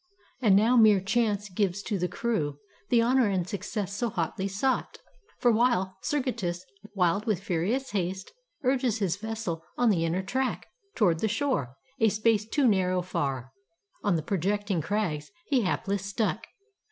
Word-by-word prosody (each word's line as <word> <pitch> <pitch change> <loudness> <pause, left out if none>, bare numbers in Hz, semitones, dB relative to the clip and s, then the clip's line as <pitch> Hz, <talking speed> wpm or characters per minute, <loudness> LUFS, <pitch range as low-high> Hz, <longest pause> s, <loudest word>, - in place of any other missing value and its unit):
And 210 -6 +5
now 225 +5 +4
mere 215 -4 +7
chance 210 +1 0
gives 195 0 -1
to 205 -4 -2
the 180 - 0
crew 175 -8 -2 0.3
The 235 -2 +4
honor 250 0 +3
and 185 -3 0
success 200 0 -4
so 235 +2 -1
hotly 190 +1 -2
sought. 215 +7 -1 0.4
For 240 - +4
while 215 -5 +2
Sergestus, 195 -11 -2 0.3
wild 195 +4 +1
with 200 -4 0
furious 200 +10 -1
haste. 190 -1 -2 0.3
Urges 250 -3 +1
his 190 -4 0
vessel 215 -6 -4
on 245 -2 +4
the 170 -4 +1
inner 170 +3 0
track 260 +6 -2 0.3
Toward 175 -8 +3
the 220 - +1
shore, 215 - -1 0.2
a 225 - +5
space 215 0 +1
too 285 0 +3
narrow 185 -3 +2
far, 135 -7 -3 0.5
On 200 -4 +2
the 160 - -1
projecting 200 +1 0
crags 160 -5 -2 0.2
he 270 -4 +2
hapless 200 0 -1
struck. 205 +1 -2
200 Hz, 155 wpm, -28 LUFS, 180-230 Hz, 0.5 s, mere